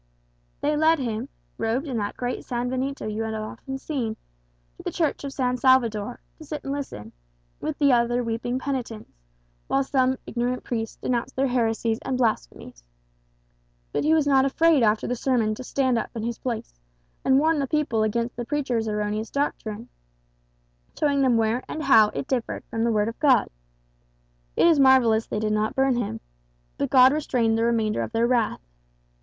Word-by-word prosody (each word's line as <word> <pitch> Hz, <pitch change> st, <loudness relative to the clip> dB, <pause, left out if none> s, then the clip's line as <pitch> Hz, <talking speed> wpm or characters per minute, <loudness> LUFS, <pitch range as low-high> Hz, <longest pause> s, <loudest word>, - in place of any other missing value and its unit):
"They 300 Hz, +1 st, +1 dB
led 315 Hz, +2 st, +4 dB
him, 240 Hz, -1 st, -3 dB, 0.3 s
robed 230 Hz, +6 st, 0 dB
in 260 Hz, -, -3 dB
that 205 Hz, -1 st, -3 dB
great 245 Hz, 0 st, -3 dB
sanbenito 255 Hz, +2 st, -3 dB
you 215 Hz, +1 st, -3 dB
have 220 Hz, 0 st, -3 dB
often 220 Hz, +5 st, -6 dB
seen, 260 Hz, -6 st, -3 dB, 0.6 s
to -, -, -13 dB
the -, -, -2 dB
Church 315 Hz, -4 st, -1 dB
of 280 Hz, -, -4 dB
San 250 Hz, -2 st, -1 dB
Salvador, 240 Hz, -3 st, +2 dB, 0.2 s
to -, -, -10 dB
sit 300 Hz, -1 st, -6 dB
and 275 Hz, -, -3 dB
listen, 270 Hz, -, -6 dB, 0.5 s
with 310 Hz, -, -4 dB
the 280 Hz, -3 st, +4 dB
other 240 Hz, +1 st, +2 dB
weeping 230 Hz, +2 st, -2 dB
penitents, 255 Hz, -5 st, -4 dB, 0.6 s
while 275 Hz, -, +2 dB
some 260 Hz, -1 st, +1 dB
ignorant 245 Hz, +1 st, -2 dB
priest 225 Hz, -2 st, -4 dB
denounced 250 Hz, +1 st, -2 dB
their 270 Hz, -, +1 dB
heresies 225 Hz, -2 st, 0 dB
and 260 Hz, -, -2 dB
blasphemies. -, -, -2 dB, 1.1 s
But -, -, -1 dB
he 310 Hz, +2 st, +4 dB
was 310 Hz, -2 st, +2 dB
not 270 Hz, -2 st, +4 dB
afraid 310 Hz, +2 st, +3 dB
after 215 Hz, -1 st, +2 dB
the 245 Hz, -, -1 dB
sermon 235 Hz, -4 st, +1 dB
to 235 Hz, -, -7 dB
stand 255 Hz, -2 st, +1 dB
up -, -, -4 dB
in 225 Hz, -, -4 dB
his 235 Hz, 0 st, -3 dB
place, 220 Hz, -, -5 dB, 0.4 s
and 265 Hz, 0 st, +4 dB
warn 315 Hz, +2 st, +3 dB
the 275 Hz, -, -1 dB
people 285 Hz, -7 st, 0 dB
against 230 Hz, +2 st, -1 dB
the 240 Hz, -, -4 dB
preacher's 250 Hz, -4 st, -1 dB
erroneous 210 Hz, +1 st, -2 dB
doctrine, 230 Hz, -5 st, -3 dB, 1.1 s
showing 285 Hz, -2 st, +2 dB
them 255 Hz, -3 st, +3 dB
where 225 Hz, +3 st, +1 dB
and 310 Hz, -, -5 dB
how 220 Hz, -6 st, +6 dB
it -, -, -3 dB
differed 250 Hz, -3 st, -2 dB
from 225 Hz, -, -1 dB
the 235 Hz, -, +2 dB
Word 210 Hz, -1 st, +1 dB
of 230 Hz, -, -6 dB
God. 275 Hz, -5 st, +4 dB, 1.1 s
It -, -, +5 dB
is 330 Hz, -4 st, +5 dB
marvellous 250 Hz, -5 st, +5 dB
they -, -, -3 dB
did 215 Hz, 0 st, 0 dB
not 215 Hz, 0 st, 0 dB
burn 270 Hz, -1 st, +2 dB
him; 215 Hz, -, -3 dB, 0.6 s
but -, -, 0 dB
God 260 Hz, +1 st, +7 dB
restrained 245 Hz, -7 st, +1 dB
the 225 Hz, -, +1 dB
remainder 225 Hz, -2 st, +1 dB
of -, -, -4 dB
their 230 Hz, +1 st, +2 dB
wrath. 235 Hz, -3 st, +1 dB
245 Hz, 180 wpm, -25 LUFS, 225-270 Hz, 1.1 s, God